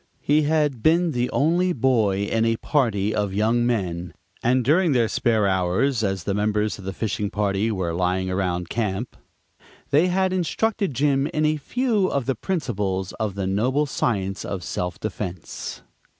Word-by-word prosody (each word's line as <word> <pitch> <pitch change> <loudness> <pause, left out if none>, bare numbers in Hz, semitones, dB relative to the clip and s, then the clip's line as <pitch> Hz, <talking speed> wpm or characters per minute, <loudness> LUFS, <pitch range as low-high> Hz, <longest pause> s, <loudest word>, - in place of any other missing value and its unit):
He 150 +2 +3
had 150 -6 +1
been 165 +4 +3
the 125 -2 -1
only 175 +5 +2
boy 110 - +2
in 110 +2 0
a 115 0 +2
party 110 -7 0
of 100 -2 -1
young 115 +3 +2
men, 90 -7 -2 0.3
and 125 +2 +2
during 165 +3 +3
their 120 -3 +3
spare 110 -2 +1
hours, 95 +7 +1
as 95 -3 -1
the 100 - -1
members 105 +1 0
of 95 - -10
the 95 - -2
fishing 105 +1 -2
party 100 +1 0
were 90 -5 -2
lying 90 +2 0
around 90 -2 -1
camp, 110 +2 -2 0.8
they 150 +5 +4
had 185 +1 +1
instructed 185 - 0
Jim 140 +1 +2
in 155 0 0
a 155 0 +2
few 220 - 0
of 140 -7 -1
the 135 - +1
first 115 - -19
principles 100 - -2
of 105 -3 -2
the 100 -1 -2
noble 125 +10 +1
science 100 -8 -1
of 95 -3 -4
self 90 0 -3
defense. 95 -5 -6
110 Hz, 170 wpm, -23 LUFS, 95-145 Hz, 0.8 s, they